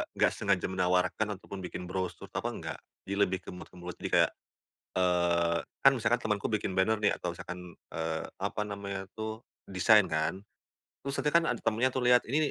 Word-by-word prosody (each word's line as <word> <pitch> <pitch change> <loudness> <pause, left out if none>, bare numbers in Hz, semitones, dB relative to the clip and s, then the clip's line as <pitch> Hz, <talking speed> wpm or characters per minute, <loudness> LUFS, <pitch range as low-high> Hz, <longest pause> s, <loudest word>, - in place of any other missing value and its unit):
nggak - - +4
sengaja - - +1
menawarkan 90 +2 +2
ataupun 100 0 -8
bikin 90 0 -6
brosur 95 -1 -3
apa - - -2
nggak, - - -5 0.3
di 100 - -2
lebih 95 -2 +2
ke - - -11
mulut 90 - -9
ke 90 - -15
mulut. 90 0 -6
Jadi - - -4
kayak, - - +5 0.7
eee, 85 -2 +3 0.2
kan 135 - +8
misalkan 120 0 +2
temanku 105 -2 0
bikin 105 -2 0
banner 110 +4 +4
nih 105 - +4
atau 85 -1 -3
misalkan, 90 0 -8 0.2
eee, 80 0 -2 0.2
apa 100 +2 -2
namanya 100 -1 -4
tuh 110 +1 -4 0.3
desain 105 +2 +5
kan, 80 +2 0 0.6
terus 140 0 -3
nanti 150 - +1
kan 170 +1 +5
ada 120 - 0
temannya 115 +4 +2
tuh 130 - -1
lihat, 125 0 +6
"Ini 135 +6 +1
95 Hz, 185 wpm, -30 LUFS, 90-110 Hz, 0.7 s, kan